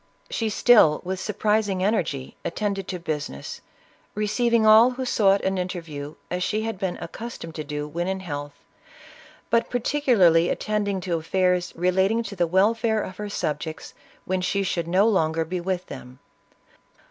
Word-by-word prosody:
She 225 -2 -1
still, 210 -8 +5
with 185 +1 -3
surprising 210 -1 0
energy, 170 - -1
attended 200 +1 -2
to 185 - -3
business, 150 - -5 0.5
receiving 220 +2 +1
all 220 +3 +8
who 255 +1 -4
sought 200 -5 +3
an 190 0 0
interview 165 -5 -5 0.2
as 180 0 -2
she 215 +4 -1
had 225 -4 -4
been 190 -3 -2
accustomed 195 -4 -7
to 155 - -5
do 150 0 -4
when 170 +4 -3
in 190 0 -2
health, 145 -4 -6 1.0
but 230 0 +2
particularly 230 - +3
at - - -1
tending 205 -3 -1
to 175 -2 -1
affairs 180 +2 0
relating 190 +6 +2
to 200 -2 -7
the 175 -2 +1
welfare 220 +4 +2
of 185 - -8
her 210 0 -5
subjects 155 -4 -4 0.3
when 185 0 -1
she 200 +2 0
should 170 -3 -2
no 190 +5 +3
longer 165 -6 +1
be 180 +2 -3
with 185 0 -2
them. 125 +1 -10
190 Hz, 160 wpm, -24 LUFS, 165-215 Hz, 1.0 s, all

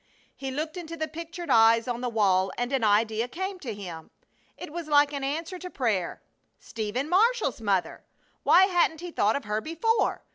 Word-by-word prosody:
He 270 - -5
looked 310 +6 -4
into 330 -1 -7
the 315 0 -2
pictured 335 0 -6
eyes 225 0 +5
on 240 -1 -3
the 250 - -1
wall 195 -4 +2
and 245 +2 -2
an 265 -4 +1
idea 220 +2 +2
came 375 +7 -5
to 260 -9 -5
him. 180 -6 -8 0.5
It 295 - -9
was 340 -2 -5
like 290 -1 +4
an 280 -1 -4
answer 325 +6 -3
to 360 - -7
prayer. 220 - -2 0.4
Stephen 230 +5 -4
Marshall's 405 - +2
mother! 195 -4 -1 0.4
Why 375 +2 +6
hadn't 345 -4 +1
he 355 0 -6
thought 215 -8 +2
of 280 - -3
her 210 +1 -2
before? 335 - 0
275 Hz, 185 wpm, -27 LUFS, 220-335 Hz, 0.5 s, Why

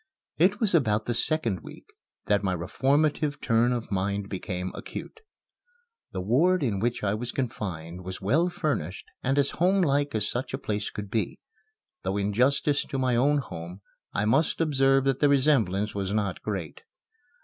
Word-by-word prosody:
It 190 +5 +4
was 215 -5 +2
about 110 -10 +2
the 120 - -1
second 115 - +2
week - - -12 0.4
that 105 -1 +2
my 95 -2 0
reformative 145 - +1
turn 115 +1 +2
of 120 -3 -3
mind 100 +1 -1
became 90 -1 -4
acute. 450 - -8 0.9
The 95 - -3
ward 160 - +3
in 105 -7 0
which 115 +2 -1
I 100 -1 +1
was 120 +3 -3
confined 90 - -4
was 95 +1 -6
well 155 - +2
furnished 135 - -3 0.2
and 135 +2 0
as 140 -1 +2
homelike 150 - +2
as 105 -2 +1
such 125 +2 -2
a - - -4
place 105 -1 -3
could 105 -1 -7
be, 110 -2 -1 0.6
though 95 +2 -2
in 100 0 -1
justice 140 +5 +3
to 135 - -4
my 130 -2 +1
own 140 +5 +3
home 90 - -6 0.3
I 105 - 0
must 150 +9 +2
observe 135 -4 +3
that 135 -1 +1
the 145 - +4
resemblance 120 -8 +2
was 100 -1 -2
not 100 -3 -1
great. 95 -7 -4
115 Hz, 170 wpm, -27 LUFS, 100-140 Hz, 0.9 s, It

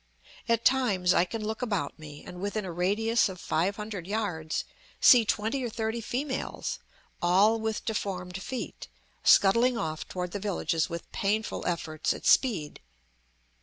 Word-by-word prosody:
At 230 0 +2
times 205 -9 +3
I 175 - +4
can 215 +3 -5
look 220 +2 -3
about 205 -9 -2
me 150 -1 -10
and, 180 0 -9
within 205 +1 -2
a 180 - -4
radius 205 +6 +2
of 185 -1 -8
five 170 +6 0
hundred 210 -5 -6
yards, 180 -7 -2 0.4
see 240 -3 +7
twenty 220 +6 -1
or 240 - -2
thirty 225 +1 -3
females, 260 +4 -3 0.4
all 195 +6 +4
with 220 -1 -3
deformed 190 -4 -3
feet, 255 +4 -6 0.4
scuttling 230 +5 +5
off 155 -6 -3
toward 180 -1 -4
the 205 - -4
villages 185 -5 -1
with 170 -1 -7
painful 210 +2 -1
efforts 160 -3 -1
at - - -10
speed. 185 - +3
205 Hz, 150 wpm, -28 LUFS, 180-225 Hz, 0.4 s, see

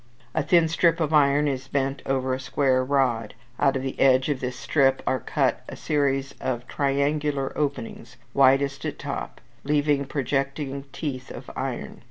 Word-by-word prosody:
A 160 - +1
thin 170 +2 +4
strip 170 +1 +2
of 160 -1 0
iron 145 0 +4
is 135 -1 -3
bent 135 0 -1
over 130 -1 0
a 130 - -2
square 130 -1 +1
rod; 130 -5 0 0.2
out 135 -2 +3
of 130 - -2
the 135 - -4
edge 130 +1 +4
of 145 -3 0
this 125 -1 -4
strip 135 0 +2
are 130 - +1
cut - - 0
a - - -7
series 135 -2 0
of 120 -2 -3
triangular 140 0 0
openings 125 -4 -4 0.2
widest 135 +1 +3
at - - -4
top, - - -5 0.2
leaving 145 -1 +1
projecting 140 0 -2
teeth 130 -4 -5
of - - -9
iron - - -1
(Appendix, - - -8
Fig. - - -17
135 Hz, 175 wpm, -25 LUFS, 130-145 Hz, 0.2 s, thin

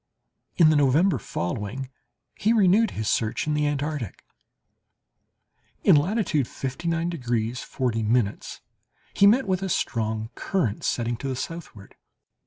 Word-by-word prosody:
In 160 -3 +6
the - - +3
November 145 +7 +3
following 105 +9 -4 0.4
he 220 +3 +1
renewed 215 +1 +4
his 110 -1 -2
search 110 0 0
in 155 - 0
the 150 0 +1
Antarctic. 145 - -3 1.6
In - - +6
latitude 155 - +1
59 165 +5 -3
degrees 120 -7 -2
40' 115 -4 -2 1.1
he 200 - +5
met 235 +3 +4
with 190 -1 0
a 190 - -2
strong 110 -5 -2
current 140 - -2
setting 120 -1 -1
to 140 - -5
the 130 - -2
southward. 130 -9 -7
145 Hz, 125 wpm, -25 LUFS, 115-175 Hz, 1.6 s, In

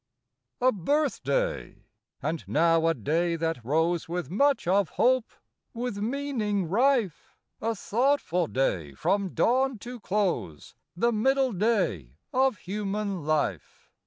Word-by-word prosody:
A 255 +1 +5
BIRTHDAY: 305 - -1 0.4
—and 160 0 -2
now 165 +1 +3
a 165 - +2
day 165 +8 0
that 165 -6 -2
rose 160 +6 0
With 175 -4 -3
much 280 +2 +2
of 195 0 +3
hope, 255 -1 +2 0.5
with 240 -3 -3
meaning 220 -5 -1
rife 230 - +1
— - - -46
A 225 +1 -1
thoughtful 220 - +1
day 90 - -1
from 195 - 0
dawn 255 +8 +2
to 245 0 -7
close; 190 - -2 0.2
The 235 +6 +2
middle 265 +4 +2
day 180 - 0 0.2
of 260 -3 +2
human 200 -3 -3
life. 150 - -2
200 Hz, 125 wpm, -27 LUFS, 165-245 Hz, 0.5 s, A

